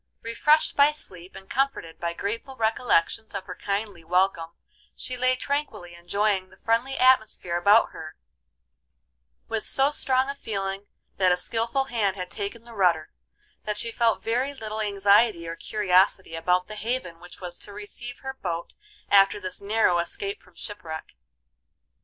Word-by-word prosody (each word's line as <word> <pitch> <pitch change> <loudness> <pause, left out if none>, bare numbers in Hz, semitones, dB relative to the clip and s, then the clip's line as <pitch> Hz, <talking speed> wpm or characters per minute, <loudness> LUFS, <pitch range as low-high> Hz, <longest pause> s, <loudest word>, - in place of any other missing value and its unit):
Refreshed 300 +7 +2
by 285 +1 +6
sleep, 185 - -8
and 190 - -11
comforted 265 -11 -1
by 170 0 -2
grateful 230 +9 -4
recollections 220 -3 +1
of 195 - -4
her 185 - -6
kindly 200 -2 -3
welcome, 170 -1 +1 0.4
she 255 - -4
lay 255 +1 +3
tranquilly 255 -11 -3
enjoying 190 +2 0
the 185 - -19
friendly 235 +6 0
atmosphere 220 -8 +3
about 200 +6 +5
her, 155 0 -9 1.3
with 220 -1 -3
so 270 +2 +3
strong 260 -2 +2
a 280 - -2
feeling 195 -6 -4 0.3
that 185 -2 +4
a 180 - +3
skilful 230 +7 0
hand 225 -7 0
had 180 -2 -6
taken 210 +3 -5
the 235 0 -13
rudder, 175 -6 +2 0.5
that 210 -1 -2
she 230 +2 -1
felt 230 -1 +1
very 255 +5 0
little 220 -3 -4
anxiety 200 -2 +3
or 165 - -4
curiosity 190 -2 +2
about 180 +2 +1
the 215 - -8
haven 210 -6 -3
which 175 +1 -13
was 180 -2 -6
to 205 - -11
receive 210 +4 -8
her 265 0 -4
boat 170 -9 -5 0.4
after 200 +1 +6
this 185 -1 -4
narrow 200 -4 +2
escape 200 +3 -3
from 180 - -23
shipwreck. 170 -6 -7
205 Hz, 155 wpm, -26 LUFS, 180-235 Hz, 1.3 s, by